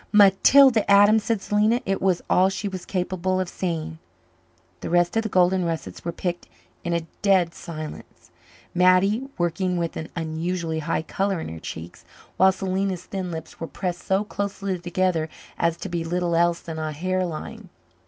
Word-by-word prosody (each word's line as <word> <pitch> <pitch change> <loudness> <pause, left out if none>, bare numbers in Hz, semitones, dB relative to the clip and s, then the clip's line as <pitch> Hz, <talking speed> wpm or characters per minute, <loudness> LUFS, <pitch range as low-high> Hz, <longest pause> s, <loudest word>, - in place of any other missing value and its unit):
"Matilda 215 +4 +6
Adams!" 205 +2 +6
said 225 -4 0
Selena. 215 +3 +2
It 195 0 -1
was 185 -2 +1
all 185 +1 +4
she 195 +2 -3
was 185 -2 -6
capable 185 0 -1
of 185 - -1
saying. 165 -3 -4 0.8
The - - -5
rest 175 +2 +2
of 225 - +3
the 220 - -4
golden 185 0 +3
russets 165 -2 -4
were 170 - -2
picked 175 0 -4 0.4
in 170 - -2
a 170 -1 -1 0.2
dead 185 -4 +3
silence, 155 -3 -9 0.4
Mattie 185 +8 +3
working 180 +1 0
with 170 -1 -2
an 160 - -5
unusually 165 0 -2
high 160 +1 -1
colour 195 +2 -1
in - - -5
her 80 0 -7
cheeks, 80 +2 -8 0.3
while 190 0 +6
Selena's 190 -1 -2
thin 190 -2 -4
lips 160 -2 -7
were 165 - -4
pressed 180 0 -4
so 190 +2 +1
closely 200 -2 -3
together 175 -2 0 0.3
as 170 0 +1
to - - -6
be 170 -2 -2
little 175 0 -1
else 170 0 +2
than 160 -1 -6
a 155 -1 -3
hair 185 +4 -1
line. 165 -4 -6
180 Hz, 175 wpm, -24 LUFS, 170-195 Hz, 0.8 s, Matilda